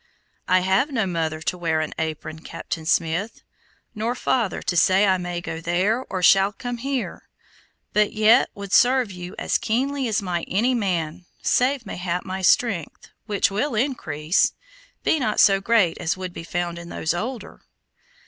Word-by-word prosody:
"I 185 0 +4
have 190 +10 +2
no 230 -7 0
mother 160 -3 -2
to 180 - -1
wear 160 -2 0
an 155 - -3
apron, 155 0 -4
Captain 160 0 -6
Smith, 170 +7 0 0.5
nor 225 +3 -2
father 240 -4 -1
to 175 - -1
say 190 +4 +4
I 190 -2 +2
may 175 -1 -4
go 165 -2 -6
there 185 +9 +1
or 185 -1 -3
shall 195 +2 +6
come 245 +3 -5
here; 265 +1 -4 0.6
but 210 0 +3
yet 220 +2 +4
would 200 -1 -7
serve 245 -1 +4
you 180 0 -8
as - - 0
keenly 265 +4 -1
as 215 -3 +1
might 175 -4 -3
any 235 +7 +2
man, 180 -6 -2 0.2
save 255 0 +2
mayhap 180 -2 -3
my 190 0 -4
strength, 185 -4 +1 0.2
which 205 -2 +1
will 225 +6 -1
increase, 180 - +1 0.5
be 320 - +2
not 215 -5 0
so 195 -1 +5
great 200 -5 +2
as 160 - -1
would 185 -1 -6
be - - -7
found 175 0 -3
in 170 0 -10
those 160 -1 -1
older." 230 +7 -5
190 Hz, 165 wpm, -23 LUFS, 175-230 Hz, 0.6 s, shall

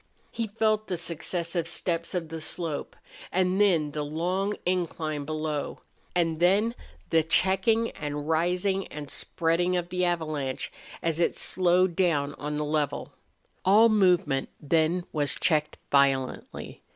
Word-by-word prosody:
He 230 -1 -2
felt 215 0 0
the 180 - -2
successive 170 0 -2
steppes 170 0 -2
of 165 -3 -2
the 165 0 -6
slope, 160 -1 -3 0.4
and 185 +2 +2
then 165 -7 +3
the 150 +1 -3
long 180 +7 -1
incline 165 -5 -1
below, 155 -1 -3 0.3
and 165 -2 +1
then 200 +6 +3 0.4
the 165 - +5
checking 190 +8 +2
and 145 0 -5
rising 180 +4 +1
and 145 -2 -7
spreading 175 +2 0
of 175 0 -3
the 180 0 -1
avalanche 155 -6 -1 0.3
as 165 -1 0
it 170 - +2
slowed 180 -1 +3
down 145 -6 +1
on 150 0 -3
the 150 - -1
level. 150 -2 -2 0.5
All 215 +5 +6
movement 180 -10 +2
then 160 +4 +1
was 145 -2 +1
checked 155 -2 +1
violently. 135 -2 0
170 Hz, 135 wpm, -27 LUFS, 150-185 Hz, 0.5 s, All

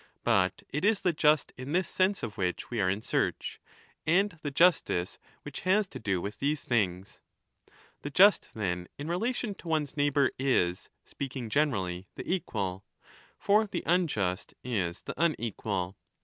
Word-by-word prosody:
But 95 -1 +2
it 150 +4 -3
is 210 0 +3
the 180 - +2
just 150 -1 +3
in 130 +4 -5
this 185 +1 +2
sense 190 +1 +1
of 105 - -4
which 90 +1 -2
we 120 -3 0
are 95 - +2
in 100 +3 -1
search, - - -1 0.4
and 185 +3 +2
the 145 - -2
justice 140 - +2 0.2
which - - -7
has 195 +2 +2
to - - -8
do 95 -4 0
with 100 +4 -5
these 145 +1 0
things. 95 -5 -1 0.8
The 145 - -4
just, 195 +8 +5
then, 90 -4 -2
in 145 - -5
relation 220 +4 -1
to 185 - -13
one's 155 -4 0
neighbour 145 -2 +3
is, 95 -10 +1 0.2
speaking 130 -4 -5
generally, 95 -11 0
the - - -7
equal. 100 - -2 0.5
For 210 +2 +3
the - - -4
unjust 125 - 0
is 95 -9 -2
the - - -5
unequal. 105 - -1
135 Hz, 160 wpm, -29 LUFS, -, 0.8 s, just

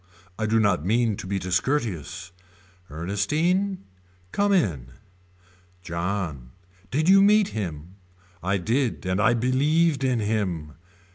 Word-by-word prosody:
I 110 - 0
do 115 +1 +2
not 100 -8 +2
mean 110 +3 +1
to - - -7
be 100 +1 -1
discourteous. 95 - -2 0.6
Ernestine. 155 - -1 0.5
Come 205 0 +1
in. 80 - 0 0.9
John. 85 -7 -4 0.4
Did 155 +5 0
you 195 +1 +7
meet 205 0 +4
him. 85 -3 -6 0.4
I 100 +3 0
did 115 +3 -1
and 95 +2 0
I 120 +2 +4
believed 140 +5 +2
in 130 -2 +1
him. 100 -8 -2
105 Hz, 120 wpm, -25 LUFS, 90-145 Hz, 0.9 s, you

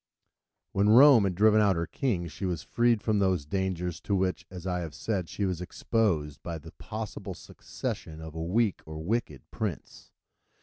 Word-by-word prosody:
When 100 +2 +2
Rome 125 -1 +8
had 95 -2 -1
driven 110 +2 +5
out 100 -3 +4
her 85 0 -1
kings, 90 - -2
she 95 - -5
was 85 -3 -3
freed 120 -2 +2
from 110 -2 +2
those 95 -6 +1
dangers 90 -1 -2
to 100 - 0
which, 95 -1 -1
as 90 -1 -9
I 90 -1 -1
have 80 -4 -6
said, 95 -1 -2
she 100 - -2
was 90 -2 -2
exposed 90 - -1
by 85 -1 -5
the 75 - -11
possible 105 -3 -6
succession 80 -1 -6
of 80 -1 -8
a 80 - -5
weak 105 +4 +1
or 80 0 -7
wicked 85 - -2
prince. - - -5
95 Hz, 180 wpm, -28 LUFS, 85-105 Hz, -, Rome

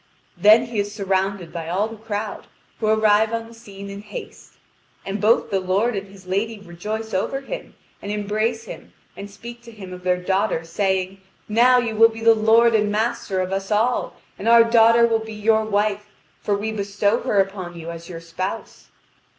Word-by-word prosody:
Then 220 +3 +6
he 235 -3 -4
is 205 0 -2
surrounded 195 -3 -2
by 165 -1 -5
all 195 +5 0
the 225 - -9
crowd, 215 -1 -5 0.3
who 220 - -1
arrive 215 0 +3
on 230 0 -3
the 230 - -14
scene 200 -3 -11
in 200 0 -8
haste. - - -10 0.5
And 195 +2 -4
both 220 +3 +3
the 195 - +1
lord 195 +6 0
and 200 0 -4
his 195 -1 -16
lady 205 +5 -2
rejoice 210 +4 -6
over 235 +8 -1
him, - - -8 0.3
and 200 - -5
embrace 215 +2 -1
him, - - -11 0.2
and 200 - -8
speak 235 +4 -11
to 235 0 -13
him 195 -4 -10
of 180 - -9
their 180 0 +2
daughter, 190 -1 0
saying: 190 +2 -2 0.3
"Now 240 +4 +5
you 235 -3 -1
will 225 +1 +7
be 225 0 -9
the 230 0 +6
lord 225 +2 +4
and 210 -1 +2
master 210 -3 -1
of 185 +1 -3
us 195 0 -3
all, 225 +4 +1 0.2
and 210 - -4
our 235 0 +8
daughter 230 0 +5
will 225 -1 +1
be 220 -1 -8
your 220 +1 +2
wife, 210 0 0 0.3
for 205 -1 0
we 215 +2 -3
bestow 205 +1 0
her 205 - +1
upon 190 -3 -2
you 165 +1 -6
as 170 +1 -10
your 165 -2 -7
spouse." 165 +3 -6
210 Hz, 195 wpm, -22 LUFS, 195-225 Hz, 0.5 s, our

